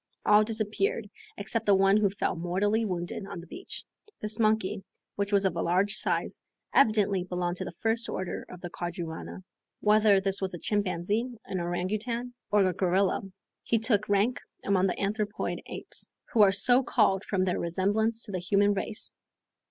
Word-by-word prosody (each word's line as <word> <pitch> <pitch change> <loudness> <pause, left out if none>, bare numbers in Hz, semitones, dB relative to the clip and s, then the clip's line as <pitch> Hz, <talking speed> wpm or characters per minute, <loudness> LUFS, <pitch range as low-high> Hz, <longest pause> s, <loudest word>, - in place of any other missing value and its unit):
All 210 0 +6
disappeared, 215 -1 -1 0.3
except 205 +2 -2
one 195 0 +5
who 210 -2 +3
fell 200 -1 -2
mortally 190 +6 0
wounded 180 +1 -4
on 175 - -7
the 170 - -10
beach. 365 - -6 0.3
This 215 +1 -1
monkey, 215 -3 +1 0.3
which 200 0 -2
was 200 -1 +3
of 185 -3 +1
a - - -1
large 185 +4 +2
size, - - -1 0.3
evidently 205 -7 +3
belonged 180 -1 -2
to - - -4
the - - -5
first 225 +6 -1
order 185 - -4
of 180 -1 -10
the 175 - -6
quadrumana. 175 +1 -6 0.4
Whether 210 -1 +5
this 195 0 -1
was 190 -2 -2
a - - -5
chimpanzee, 205 +5 -1
an 185 - -3
orangoutang, 210 +8 -2 0.2
or 205 -2 +4
a 185 - 0
gorilla, 185 +2 +1 0.4
he 230 - +1
took 220 -2 +1
rank 205 +5 +2 0.3
among 195 -1 +3
the 180 - -2
anthropoid 210 +1 -2
apes, - - 0 0.2
who 225 - +5
are 200 -2 +7
so 245 +6 +4
called 195 -6 +2
from 185 -3 0
their 180 - 0
resemblance 205 +6 +1
to 210 - -7
the 185 - -2
human 200 +3 +2
race. 205 +2 -3
200 Hz, 170 wpm, -28 LUFS, 185-215 Hz, 0.4 s, are